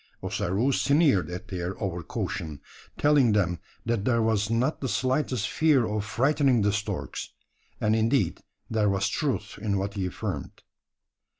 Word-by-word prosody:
Ossaroo 105 +10 0
sneered 140 - +3
at 90 +4 -7
their 90 0 -4
over 95 -4 -2
caution 80 -2 -4 0.4
telling 145 -6 +4
them, 90 -4 +1 0.3
that 115 -3 0
there 115 0 +2
was 110 -2 +1
not 120 +6 0
the 130 - -2
slightest 130 -3 0
fear 150 -2 +3
of 105 -1 -2
frightening 130 +1 +2
the 100 0 +2
storks; 105 0 -3 0.5
and 110 +1 +2
indeed 115 +4 +1 0.3
there 110 -2 +1
was 100 +1 +1
truth 110 -9 -2
in 100 -2 0
what 100 +1 -2
he 95 -3 -2
affirmed. 90 - -5
110 Hz, 145 wpm, -27 LUFS, 100-130 Hz, 0.5 s, telling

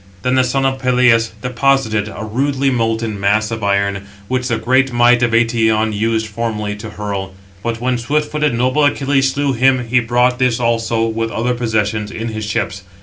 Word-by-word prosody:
Then 125 - +1
the 130 0 +4
son 135 +2 0
of 135 0 0
Peleus 125 -3 +3
deposited 125 -4 +1
a 110 - -7
rudely 135 +4 0
molten 115 -3 -1
mass 105 +3 +1
of 110 -2 -4
iron, 100 0 0 0.2
which 130 +1 -1
the 120 -3 0
great 130 +2 +2
might 120 0 +4
of 120 - +3
Eëtion 115 -1 +2
used 110 +1 0
formerly 105 -1 -3
to 110 +1 -8
hurl. 100 -2 -5 0.3
But 115 0 -3
when 125 0 -1
swift 150 +5 -1
footed, 150 -4 0
noble 130 +5 +1
Achilles 135 -2 +2
slew 140 0 -1
him, 125 -1 +2
he 125 +1 +4
brought 125 +1 +1
this 125 -2 +1
also, 115 -1 0
with 115 0 -2
other 120 +2 -1
possessions, 110 -3 -1
in 115 +3 -5
his 110 -1 -5
ships. 100 -2 -2
115 Hz, 185 wpm, -17 LUFS, 110-130 Hz, 0.3 s, the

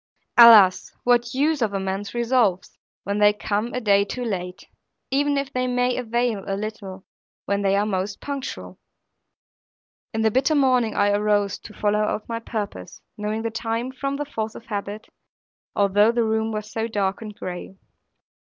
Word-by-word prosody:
Alas 220 -6 +8
what 240 0 +2
use 295 +1 +1
of 215 -3 0
man's 195 +2 -3
resolves, 235 -6 +1 0.3
when 200 +1 -2
they 205 0 +6
come 210 +2 -2
a 250 - -2
day 200 -4 +3
too 245 +5 -5
late; 180 -3 -5 0.4
even 285 +1 +1
if 275 0 -3
they 255 0 0
may 250 0 +1
avail 235 -3 -1
a 195 -1 -2
little, 200 -3 -7 0.4
when 200 +1 0
they 195 0 +2
are 205 +1 +2
most 195 -1 -2
punctual! 280 -2 -6 1.3
In 220 - -2
the 220 - +3
bitter 270 +6 +2
morning 255 -6 +2
I 205 0 +3
arose, 205 -1 +1
to 215 - -12
follow 210 0 +1
out 210 0 -2
my 230 0 -3
purpose, 205 - -6 0.2
knowing 215 +1 -3
the 230 - -2
time 230 +2 -3
from 275 +1 -3
the 295 +1 -3
force 220 -6 -4
of 230 - -11
habit, 205 0 -5 0.7
although 205 +2 +4
the 235 0 +1
room 220 0 0
was 215 0 -5
so 225 0 -2
dark 200 -3 -1
and 215 -2 -8
gray. 180 +1 -7
220 Hz, 170 wpm, -23 LUFS, 200-240 Hz, 1.3 s, Alas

